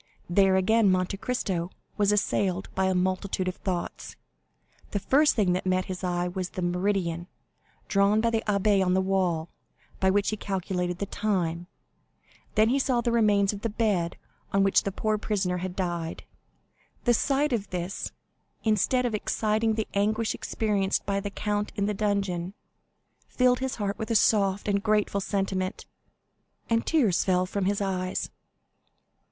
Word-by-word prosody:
There, 190 +1 +4
again, 205 +3 +4
Monte 185 +1 0
Cristo 190 -7 -2 0.3
was 205 -1 +3
assailed 195 -2 0
by 190 - +1
a 190 0 +1
multitude 185 +1 -1
of 185 - -3
thoughts. 185 -3 -4 0.7
The 205 - -1
first 295 +9 +3
thing 200 -6 +2
that 180 - -1
met 185 0 +1
his 185 0 -6
eye 175 -1 0
was 180 0 -3
the 185 - -5
meridian, 175 -1 -1 0.6
drawn 200 +2 +3
by 230 +1 +2
the 225 -1 0
abbé 200 -1 +3
on 180 0 +2
the - - +3
wall, 185 -4 0 0.5
by 190 - +3
which 200 +2 +2
he 215 - -2
calculated 180 -3 -2
the 200 - -2
time; 175 -5 -1 0.9
then 215 +1 +4
he 270 +3 +2
saw 255 -3 +1
the 235 0 0
remains 210 -3 +3
of 200 - -7
the 230 - -1
bed 205 -6 0 0.3
on 195 0 +3
which 195 - +4
the 200 - -1
poor 215 +2 -1
prisoner 190 -4 -1
had 180 0 -4
died. 170 -3 -3 0.8
The 240 - +4
sight 275 +3 +1
of 210 -4 -2
this, 180 +2 -4 0.5
instead 225 +4 +2
of 240 - -1
exciting 215 +1 0
the 220 -1 -2
anguish 215 +3 +1
experienced 205 -3 -1
by 200 0 0
the 205 +1 -4
count 210 +1 -2
in 200 -2 0
the 210 - 0
dungeon, 195 -3 -1 0.7
filled 250 -1 +2
his 265 0 -2
heart 205 -2 -3
with 220 - -4
a 230 - +1
soft 200 -2 +3
and 200 -1 +1
grateful 210 -2 +1
sentiment, 190 -1 -2 0.9
and 230 0 +1
tears 235 - +3
fell 185 -1 +2
from 190 +1 -2
his 200 +1 0
eyes. 185 -2 -2
200 Hz, 165 wpm, -27 LUFS, 185-215 Hz, 0.9 s, There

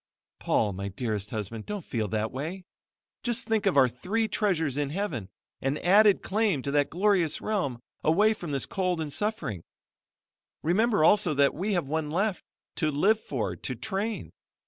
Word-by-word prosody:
"Paul, 105 - +1
my 100 +2 -4
dear 110 +3 -2
husband, 110 0 -5
don't 205 -5 -4
feel 110 -4 -2
that 110 +2 -1
way. 165 +8 -5 0.6
Just 240 0 0
think 220 -3 +1
of 185 - +2
our 130 -2 +7
three 195 - -1
treasures 165 - 0
in 145 -1 -1
heaven, 150 - -3 0.3
an 135 +2 0
added 200 +4 +5
claim 200 - +1
to 140 - -2
that 145 0 +2
glorious 180 -4 +2
realm, 175 - -1 0.2
away 205 +8 +4
from 175 -7 -7
this 140 -1 0
cold 185 -3 -1
and 150 -3 -2
suffering. 205 - -2 1.0
Remember 205 +3 +3
also 180 -2 +4
that 140 0 +4
we 200 +6 -1
have 175 -5 0
one 155 +1 -2
left, 190 +5 0 0.3
to 155 - +2
live 195 +10 +3
for, 110 - -3
to 130 - -4
train. 210 - -3
160 Hz, 170 wpm, -28 LUFS, 135-205 Hz, 1.0 s, our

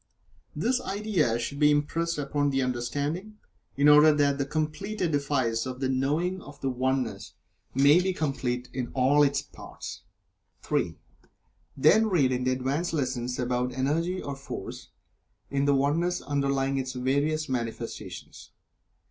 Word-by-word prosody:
This 255 +1 +1
idea 195 - 0
should 140 +4 -4
be 150 -1 +6
impressed 165 +3 0
upon 145 0 0
the 135 -1 +1
understanding, 145 - -3 0.4
in 140 +1 +4
order 150 +1 +8
that 145 -1 +2
the 140 - -1
complete 155 +8 -3
edifice 140 -7 0
of 130 0 -6
the 135 -1 0
Knowing 155 +8 0
of 145 -3 -12
the 135 - -1
Oneness 125 -5 -2 0.4
may 145 +6 +6
be 190 +1 0
complete 130 -7 -2
in 125 -2 -2
all 135 +3 +4
of 145 - +6
its 140 - -2
parts. - - -9 0.6
(3) - - -1 0.8
Then 210 +11 +5
read 155 -10 +2
in 125 0 -1
the 130 - +2
"Advanced 135 +7 -1
Lessons" 125 -4 -2
about 125 0 -1
Energy 160 +8 0
or 140 - -4
Force, 135 +1 -8 0.6
in 140 0 +1
the 140 0 +4
oneness 165 +6 +1
underlying 140 -1 0
its 130 -1 -3
various 140 +5 0
manifestations. 115 -2 -6
140 Hz, 145 wpm, -27 LUFS, 130-155 Hz, 0.8 s, order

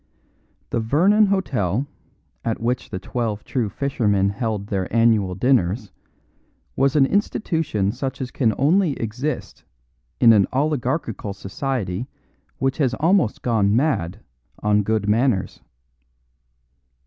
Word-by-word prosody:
The - - 0
Vernon 185 - +3
Hotel 130 - 0 0.6
at 115 -1 -2
which 120 +2 -2
The - - -4
Twelve 110 +1 -3
True 120 -5 -2
Fishermen 105 -7 0
held 110 -2 -3
their 95 -3 -3
annual 110 -5 +3
dinners 105 -2 +1 0.8
was 135 +2 +2
an 140 -3 +5
institution 160 - 0
such 130 +3 -4
as 130 -2 -4
can 115 -5 +1
only 160 +3 +3
exist 125 +5 -4 0.6
in 115 -2 +7
an 100 -3 +4
oligarchical 130 -6 -1
society 105 +1 -3 0.5
which 135 +1 -1
has 130 -4 +1
almost 165 - +1
gone 110 -4 +2
mad 110 - 0 0.4
on 105 0 +3
good 105 0 -1
manners. 105 -3 +1
115 Hz, 115 wpm, -22 LUFS, 105-135 Hz, 0.8 s, in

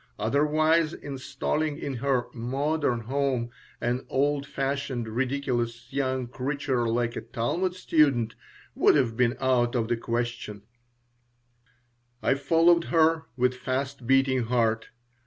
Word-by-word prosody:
Otherwise 155 +7 +2
installing 145 +2 -3
in 140 -5 -4
her 130 -1 +1
"modern" 135 +1 -1
home 130 -1 -1 0.3
an 120 +2 -1
old 140 +1 +1
fashioned, 135 -4 -2
ridiculous 120 -1 -2
young 130 -2 0
creature 130 -1 -1
like 120 +1 0
a - - -3
Talmud 175 +10 -2
student 140 -10 +2 0.4
would - - +4
have 125 -6 +2
been 120 0 +2
out 125 -2 +2
of 115 -2 0
the 120 - +1
question 115 -3 -3 1.6
I - - +4
followed 165 +4 +3
her 160 -1 +3
with 125 0 +2
fast 130 0 -3
beating 135 -2 +3
heart. 115 -2 +1
130 Hz, 120 wpm, -27 LUFS, 120-145 Hz, 1.6 s, would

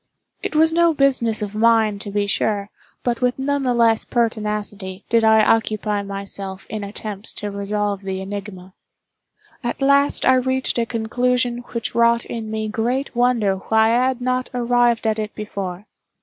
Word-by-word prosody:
It - - -4
was 320 +1 +5
no 340 -1 +3
business 250 -6 +2
of 205 -1 -5
mine, 220 -2 +3
to 205 - -5
be 205 0 0
sure, 200 0 -1 0.3
but 240 0 -1
with 250 0 +1
none 285 +1 -1
the 250 -2 0
less 230 -2 +3
pertinacity 210 -4 -2
did 230 -1 +3
I 220 0 +5
occupy 215 -2 +1
myself 195 -1 -5
in 215 -1 -4
attempts 205 +1 -4
to 205 0 -3
resolve 200 0 -2
the 190 -1 -4
enigma. 190 -1 -7 0.9
At 240 - -3
last 280 +1 +3
I 260 - +6
reached 260 -1 0
a 230 - 0
conclusion 245 +1 0
which 235 -2 -3
wrought 235 0 +3
in 225 -2 -5
me 220 0 -3
great 240 +6 -2
wonder 235 -5 +2
why 220 +3 +2
I 250 +2 +3
had 260 -1 -2
not 255 0 -1
arrived 240 -1 +2
at 220 0 +1
it 215 -1 -4
before. 200 -3 -5
220 Hz, 165 wpm, -21 LUFS, 205-245 Hz, 0.9 s, I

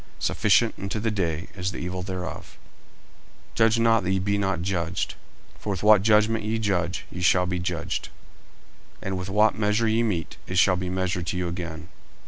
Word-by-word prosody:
Sufficient 110 +2 +2
unto 100 +2 -3
the 110 +1 0
day 85 -3 -2
is 95 -1 -2
the 85 - -7
evil 90 +1 -4
thereof. 90 -1 -6 0.9
40:007:001 - - -27
Judge 115 0 +3
not, 115 -1 +4
that 90 - -1
ye 95 - +2
be 100 +2 0
not 95 -4 -1
judged. 85 -2 -1 0.5
40:007:002 - - -23
For - - -5
with 95 -2 -2
what 105 -2 +7
judgment 110 +1 +3
ye 110 +2 -1
judge, 90 -5 -1
ye 90 - -6
shall 90 +1 +4
be 90 -1 -2
judged: 85 -2 -3 0.9
and 95 0 -2
with 90 +1 -4
what 105 +2 +3
measure 105 +2 +2
ye 110 +1 +2
mete, 95 -9 -2
it 95 - -3
shall 90 +1 +5
be 90 0 -3
measured 90 -1 -2
to 90 - -2
you 90 -1 -1
again. 85 0 -6
95 Hz, 195 wpm, -25 LUFS, 90-105 Hz, 0.9 s, what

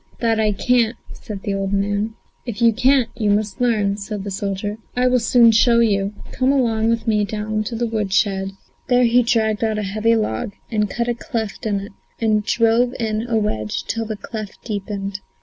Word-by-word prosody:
"That 225 -2 +1
I 215 -1 +3
can't," 235 +2 +2 0.2
said 205 -4 -8
the 200 - -1
old 195 0 -2
man. 205 +2 0 0.3
"If 235 -4 -6
you 230 -1 +5
can't, 255 +1 +3
you 215 -3 0
must 205 +2 0
learn," 210 -5 +2
said 205 -1 -5
the 200 - -5
soldier. 200 +2 -3 0.2
"I 250 +1 +2
will 250 0 +4
soon 235 0 +5
show 235 +2 +4
you. 205 -3 +1 0.2
Come 255 +1 +1
along 230 -5 +2
with 230 0 0
me 210 -2 +2
down 215 +1 -2
to 230 - -4
the 240 +1 0
wood 215 -4 -2
shed." 195 -1 +1 0.3
There 250 -1 +4
he 240 +1 +5
dragged 225 -2 +1
out 220 -1 0
a 210 - -1
heavy 215 +4 +1
log 200 - -2 0.2
and 210 -2 +1
cut 235 +3 -2
a 240 - +1
cleft 230 -4 -4
in 200 -2 0
it, 200 - -9 0.3
and 215 -2 +2
drove 230 +3 +2
in 220 0 -1
a 230 -2 +1
wedge 110 - -2
till 225 -1 -3
the 215 -1 -4
cleft 215 -1 -8
deepened. 200 -2 -4
220 Hz, 200 wpm, -20 LUFS, 205-235 Hz, 0.3 s, you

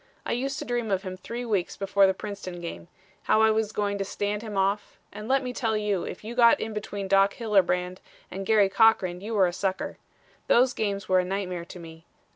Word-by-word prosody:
I - - -2
used 270 +4 -2
to - - -5
dream 240 -2 -2
of 195 -1 0
him 185 -1 -5
three 235 +6 -6
weeks 200 -6 -1
before 195 0 +3
the 190 - +1
Princeton 185 -3 -7
game; 170 0 -7 0.4
how 215 - +3
I 220 - +5
was 220 -1 0
going 205 -1 -1
to - - 0
stand 205 +1 -3
him 215 -3 -6
off, 195 +2 0 0.2
and 210 +1 -7
let 270 +1 +2
me 250 -1 -4
tell 225 -3 0
you 205 -3 -1
if - - -7
you 225 +2 -6
got 235 -1 +5
in 220 - -4
between 205 -2 -5
Doc 195 +1 +4
Hillebrand 185 -5 +1 0.3
and 195 +1 -5
Garry 210 -1 +4
Cochran 190 -4 +3
you 220 +3 -4
were 195 -2 +5
a 175 - -1
sucker. 190 +1 -3 0.5
Those 250 +1 +4
games 200 -3 -2
were 185 0 +4
a - - +2
nightmare 180 -2 -3
to 180 - -11
me. 165 -1 -12
200 Hz, 225 wpm, -26 LUFS, 185-220 Hz, 0.5 s, I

